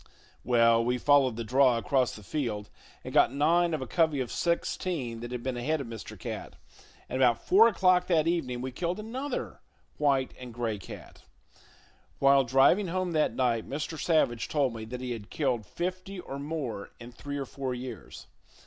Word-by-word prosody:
Well, 115 Hz, -1 st, +4 dB
we 125 Hz, +1 st, 0 dB
followed 135 Hz, -2 st, +4 dB
the 115 Hz, -, -4 dB
draw 125 Hz, +1 st, +4 dB
across 130 Hz, +1 st, +1 dB
the 105 Hz, -, -11 dB
field 105 Hz, -5 st, -3 dB, 0.3 s
and -, -, -7 dB
got -, -, +5 dB
nine 170 Hz, +5 st, +2 dB
of 140 Hz, -, -4 dB
a -, -, -5 dB
covey 160 Hz, +1 st, +1 dB
of 125 Hz, -2 st, -3 dB
sixteen 170 Hz, -7 st, -2 dB
that 120 Hz, +1 st, -7 dB
had 125 Hz, -1 st, -5 dB
been 130 Hz, -2 st, -2 dB
ahead 155 Hz, +6 st, 0 dB
of 140 Hz, -, -4 dB
Mr. 115 Hz, -2 st, -8 dB
Cat; -, -, -6 dB, 0.5 s
and 130 Hz, -, -3 dB
about 120 Hz, -3 st, +3 dB
four 215 Hz, +5 st, +7 dB
o'clock 185 Hz, -4 st, +3 dB
that 160 Hz, -4 st, +3 dB
evening 130 Hz, -8 st, -1 dB
we 130 Hz, +1 st, -4 dB
killed 175 Hz, +8 st, -3 dB
another 250 Hz, +5 st, -5 dB, 0.4 s
white 140 Hz, -3 st, +2 dB
and 125 Hz, -2 st, -9 dB
gray 115 Hz, -4 st, -2 dB
cat. -, -, -11 dB, 1.0 s
While 135 Hz, -1 st, +5 dB
driving 135 Hz, -, +4 dB
home 185 Hz, +1 st, -1 dB
that 155 Hz, -2 st, +1 dB
night, 120 Hz, -3 st, 0 dB
Mr. 155 Hz, +3 st, -4 dB
Savage 120 Hz, -9 st, +1 dB
told 140 Hz, -5 st, +1 dB
me 110 Hz, -1 st, -6 dB
that 125 Hz, +3 st, -7 dB
he 125 Hz, -1 st, -4 dB
had 110 Hz, -3 st, -6 dB
killed 125 Hz, -, -1 dB
fifty 185 Hz, +2 st, -4 dB
or 140 Hz, -5 st, -7 dB
more 140 Hz, -9 st, -4 dB
in 120 Hz, +1 st, -10 dB
three 145 Hz, +4 st, -6 dB
or 140 Hz, -, -3 dB
four 130 Hz, -1 st, -4 dB
years. 125 Hz, -4 st, -8 dB
135 Hz, 185 wpm, -29 LUFS, 120-160 Hz, 1.0 s, four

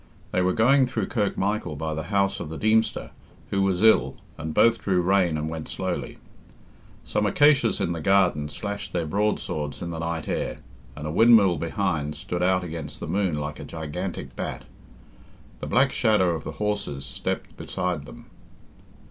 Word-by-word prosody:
They 90 Hz, -, +1 dB
were 90 Hz, 0 st, +2 dB
going 130 Hz, +4 st, +4 dB
through 110 Hz, -6 st, -2 dB
Kirk 105 Hz, -5 st, 0 dB
Michael 100 Hz, -5 st, -1 dB
by 80 Hz, +2 st, -3 dB
the 80 Hz, 0 st, -4 dB
house 100 Hz, -1 st, +1 dB
of 85 Hz, -, -5 dB
the 80 Hz, -, -6 dB
Deemster, 110 Hz, +1 st, +1 dB, 0.4 s
who 100 Hz, -, +1 dB
was 95 Hz, 0 st, +1 dB
ill, 110 Hz, -, +5 dB, 0.2 s
and 80 Hz, +1 st, -5 dB
both 115 Hz, +8 st, +4 dB
drew 95 Hz, -2 st, +1 dB
rein 90 Hz, -2 st, +2 dB
and 75 Hz, +1 st, -2 dB
went 80 Hz, -1 st, -5 dB
slowly. -, -, -4 dB, 0.9 s
Some 105 Hz, -, 0 dB
acacias 145 Hz, 0 st, +4 dB
in -, -, 0 dB
the 85 Hz, -2 st, -3 dB
garden 90 Hz, -5 st, +3 dB
slashed 100 Hz, +7 st, -5 dB
their 85 Hz, -2 st, 0 dB
broadswords 80 Hz, -5 st, -1 dB
in 85 Hz, -, -5 dB
the 80 Hz, -, -5 dB
night 80 Hz, -1 st, -3 dB
air, -, -, -2 dB, 0.4 s
and 75 Hz, -, -7 dB
a 75 Hz, -, -2 dB
windmill 105 Hz, -3 st, +6 dB
behind 80 Hz, -4 st, -1 dB
stood 85 Hz, +3 st, -4 dB
out 90 Hz, 0 st, +2 dB
against 80 Hz, -4 st, -6 dB
the -, -, -5 dB
moon 95 Hz, -5 st, 0 dB
like 75 Hz, 0 st, -5 dB
a -, -, -6 dB
gigantic 85 Hz, +4 st, -5 dB
bat. -, -, -4 dB, 1.0 s
The -, -, -5 dB
black 130 Hz, +2 st, +3 dB
shadow 105 Hz, -6 st, +3 dB
of 80 Hz, -3 st, -4 dB
the -, -, -5 dB
horses 105 Hz, -10 st, -2 dB
stepped -, -, -4 dB
beside 85 Hz, -6 st, -3 dB
them. -, -, -12 dB
90 Hz, 175 wpm, -25 LUFS, 80-105 Hz, 1.0 s, windmill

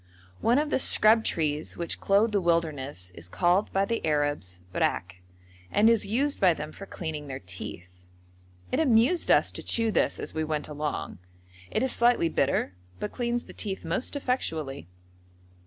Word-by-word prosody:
One 235 Hz, +3 st, +3 dB
of 295 Hz, +1 st, 0 dB
the -, -, +2 dB
scrub 220 Hz, -2 st, +5 dB
trees 155 Hz, -4 st, -1 dB
which 170 Hz, -1 st, -2 dB
clothe 205 Hz, +3 st, +3 dB
the 200 Hz, -2 st, +1 dB
wilderness 145 Hz, -, -1 dB
is 85 Hz, 0 st, -11 dB
called 180 Hz, -, +2 dB
by 195 Hz, +1 st, +2 dB
the 230 Hz, +3 st, -2 dB
Arabs 145 Hz, -, -1 dB
rack, 90 Hz, +1 st, -1 dB, 0.5 s
and 220 Hz, +2 st, +4 dB
is 225 Hz, -3 st, +1 dB
used 275 Hz, +7 st, 0 dB
by 180 Hz, -4 st, +4 dB
them 150 Hz, 0 st, -6 dB
for 195 Hz, -, -10 dB
cleaning 155 Hz, -5 st, -5 dB
their 130 Hz, -1 st, -5 dB
teeth. 90 Hz, -1 st, -9 dB, 0.7 s
It 265 Hz, -, +1 dB
amused 265 Hz, +3 st, +3 dB
us -, -, +4 dB
to -, -, -5 dB
chew 230 Hz, -1 st, +1 dB
this -, -, +1 dB
as -, -, -4 dB
we 160 Hz, -, -1 dB
went 155 Hz, -1 st, -2 dB
along: 150 Hz, -8 st, -4 dB, 0.5 s
it 220 Hz, -, 0 dB
is 260 Hz, -, +2 dB
slightly 235 Hz, -8 st, +3 dB
bitter, 135 Hz, -10 st, 0 dB, 0.3 s
but 210 Hz, -, -4 dB
cleans 240 Hz, -1 st, -2 dB
the -, -, -12 dB
teeth 195 Hz, -5 st, -4 dB
most 170 Hz, -, -1 dB
effectually. 160 Hz, -, -2 dB
170 Hz, 170 wpm, -27 LUFS, 145-230 Hz, 0.7 s, scrub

